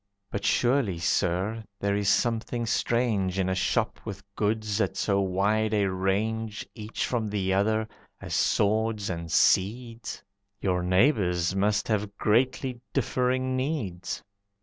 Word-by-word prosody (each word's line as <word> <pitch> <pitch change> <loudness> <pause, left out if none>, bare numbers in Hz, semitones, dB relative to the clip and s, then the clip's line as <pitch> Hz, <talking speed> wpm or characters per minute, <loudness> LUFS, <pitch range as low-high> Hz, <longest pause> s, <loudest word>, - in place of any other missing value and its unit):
"But 100 - -3
surely, 120 -3 +2
Sir, 90 +6 0 0.2
there 100 0 0
is 100 -1 +1
something 120 0 +1
strange 110 -5 +1
In 95 -1 +1
a 95 - +1
shop 95 - 0
with 100 -2 -7
goods 110 0 0
at - - -1
so 100 -1 +1
wide 105 +3 +1
a 100 -2 +2
range 105 +4 -1
Each 110 -1 -4
from 115 -3 -1
the 100 -2 0
other, 110 +3 +1 0.3
as - - -6
swords 110 -1 +1
and 85 -2 -5
seeds. 115 +4 +1 0.4
Your 90 -2 0
neighbours 90 - +2
must 105 +1 +1
have 105 -2 -1
greatly 125 +2 +1
differing 130 +1 0
needs." 130 - -3
105 Hz, 130 wpm, -27 LUFS, 95-115 Hz, 0.4 s, surely